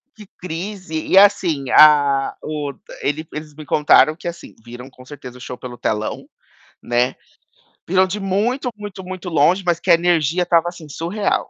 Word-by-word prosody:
Que 215 - -13
crise? 180 -1 -6
E 190 - +3
assim, 180 -9 +4
a 145 -3 +5
o 150 -2 -4 0.3
ele 155 +2 -2
eles 150 -1 -7
me 155 -1 -10
contaram 150 +1 +4
que, 175 - -9
assim, 170 0 -8
viram 120 +3 -11
com 125 -1 -17
certeza 130 -3 -11
o - - -15
show 125 0 -7
pelo 125 -1 -9
telão, 110 -2 -3 0.5
né. 120 +2 0 0.7
Viram 185 +2 +3
de 190 +3 -4
muito, 215 +7 -1
muito, 205 -2 -8
muito 185 0 -8
longe, 170 +5 +2
mas 170 -1 +1
que 180 - -6
a - - +8
energia 170 0 +1
estava 170 -1 +2
assim, 170 -3 -12
surreal. 175 +8 -2
160 Hz, 170 wpm, -19 LUFS, 140-185 Hz, 0.7 s, a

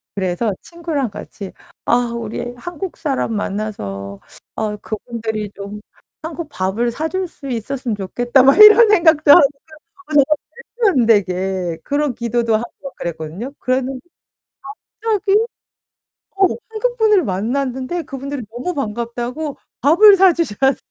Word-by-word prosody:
그래서 190 +2 -1
친구랑 325 -7 -3
같이 200 -1 -9 0.3
'아 - - +3 0.2
우리 235 +1 -5
한국 350 +5 -6
사람 270 -7 -2
만나서 100 - -4 0.4
아 215 -1 -2
그분들이 220 -1 -4
좀 200 +1 -8 0.4
한국 320 -1 -6
밥을 200 +5 -1
사 315 +6 -3
줄 375 +1 -2
수 280 -3 -11
있었으면 245 0 -3
좋겠다.' 240 +6 +2
막 275 +6 +5
이런 425 +1 +9
생각도 320 -7 +5
하고. - - +9 0.2
그러니까 315 - -16 0.4
어 - - -4
정말 285 -2 +6 0.7
말도 250 - +4
안 - - +2
되게 185 -5 +1
그런 285 -2 0
기도도 235 -1 0
하고 235 +2 -3
막 275 - -8
그랬거든요. 170 - -5
그랬는데 255 +1 -1 1.0
갑자기 420 -3 +1 1.0
어, 385 0 +5 0.2
한국분을 440 -4 +2
만났는데 255 - -2
그분들이 275 -1 -6
너무 255 +10 -4
반갑다고 240 +3 -4 0.2
밥을 390 - +7
사 375 -1 +6
주셨어요. 270 - +1
255 Hz, 300 characters per minute, -18 LUFS, 210-315 Hz, 1.0 s, 이런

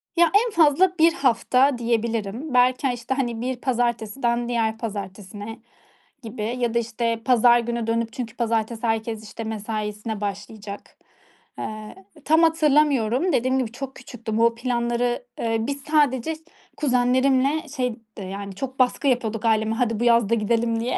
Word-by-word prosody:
Ya, 335 -1 +4 0.2
en - - -4
fazla 345 +2 +4
1 330 +1 +6
hafta 260 0 +2
diyebilirim. 230 +2 -2
Belki 255 +2 +3
ha 250 - 0
işte, 245 +2 -3
hani, 240 -4 -2
bir 255 +1 -2
pazartesiden 240 -1 -1
diğer 225 -2 0
pazartesine 205 0 -7 0.6
gibi 225 -1 -6 0.2
ya 240 -2 0
da, 235 - +3
işte, 230 0 -2
pazar 240 -1 +5
günü 235 -1 -3
dönüp 230 0 -1
çünkü 235 -2 -6
pazartesi 230 0 -1
herkes, 225 0 -2
işte, 220 +1 -7
mesaisine 215 0 -4
başlayacak. 205 0 -7 0.6
Iıı, 215 0 -6 0.3
tam 320 +2 +4
hatırlamıyorum. 300 -2 +3
Dediğim 255 +2 +2
gibi, 240 -4 -2
çok 265 +2 -7
küçüktüm. 225 -3 -5
O 230 0 +4
planları, 240 0 -1 0.2
ııı, 225 +1 -1
biz 280 0 -3
sadece 290 -2 +2
iş 310 - -11 0.4
kuzenlerimle 260 +2 +2
şey 250 -3 0 0.2
d 200 - -6
yani 195 +1 -6
çok 265 +5 -6
baskı 255 +3 +2
yapıyorduk 230 -3 0
aileme 220 0 +2
hadi 230 -2 0
bu - - 0
yaz 235 -3 +4
da 230 - +3
gidelim 230 +1 0
diye. 240 +2 -1
235 Hz, 155 wpm, -23 LUFS, 220-255 Hz, 0.6 s, 1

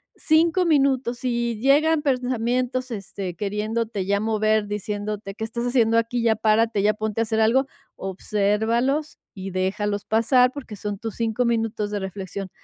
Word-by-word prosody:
5 330 +3 +3
minutos. 270 -5 +2
Si 235 -3 -1
llegan 295 +4 +3
pensamientos, 255 -1 0
este, 195 -4 -5
queriéndote 210 +1 -2
ya 200 +1 +1
mover, 215 -1 +1
diciéndote: 205 0 -4
"¿Qué 220 - -6
estás 235 +2 -3
haciendo 230 -2 +3
aquí? 230 +1 0
Ya 225 -1 +3
párate, 215 -1 +2
ya 210 - +4
ponte 215 +1 -2
a - - +3
hacer 220 0 -1
algo", 245 +5 +3 0.3
obsérvalos 220 +9 0 0.2
y 195 0 -6
déjalos 200 +2 -1
pasar, 250 +4 +3
porque 260 -6 -8
son 205 0 -5
tus 225 -3 -5
5 230 +1 0
minutos 225 -3 0
de 205 -1 -2
reflexión. 190 0 -6
225 Hz, 150 wpm, -23 LUFS, 205-245 Hz, 0.3 s, ya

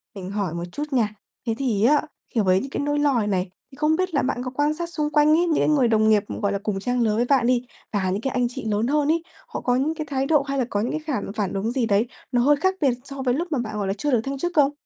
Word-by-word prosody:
mình 185 -1 -6
hỏi 200 -5 -2
một 170 - -4
chút 290 - -4
nha. 220 -4 +1 0.3
Thế 225 - +1
thì 235 -7 0
á, 290 +5 +5 0.3
kiểu, 225 -5 +2
với 185 0 +4
những 275 - -6
cái - - -4
nỗi 290 0 0
lo 290 -1 +3
này 210 -2 0
này, 185 -2 0 0.2
thì - - -13
không 305 +2 +2
biết 370 +1 -1
là 285 - +2
bạn 250 -1 -1
có 255 - -4
quan 290 +3 +1
sát 340 +2 -4
xung 300 -3 -1
quanh 300 0 +4
ấy, 310 - +6
những 320 - +2
cái - - +2
người 280 -5 +4
đồng 220 -1 +3
nghiệp, 210 -2 +4 0.2
gọi 200 -1 +1
là, 200 - -1
cùng 210 -3 -1
trang 245 +4 -1
lứa 215 -2 +2
với 240 - +2
bạn 250 -2 +3
đi, 250 -1 +3 0.3
và 190 -2 0
những 200 +4 -2
cái 270 - -2
anh 250 -2 +1
chị 250 -2 -7
lớn 215 +2 0
hơn 295 0 +2
ấy, 330 0 0 0.2
họ - - -5
có 245 - +1
những 285 +5 +1
cái 310 - -4
thái 270 -1 0
độ 300 0 +4
hay 275 0 -3
là 255 - +1
có 205 - 0
những 235 - -1
cái 310 - -2
khảm 275 -10 -3
phản 200 -3 -1
ứng 205 +4 -1
gì 250 -2 0
đấy 210 +1 +2 0.3
nó 245 - +3
hơi 290 +4 +5
khác 375 +6 +1
biệt 275 - +4
so 275 0 -7
với 250 -2 +1
lúc 335 +6 -2
mà 285 - +1
bạn, 215 -3 -4
gọi 200 -2 -1
là, 195 - 0
chưa 295 +7 -2
được 240 -4 +3
thăng 275 +3 -4
chức 350 +6 -2
không? 290 -2 +5
250 Hz, 325 wpm, -23 LUFS, 215-290 Hz, 0.3 s, ấy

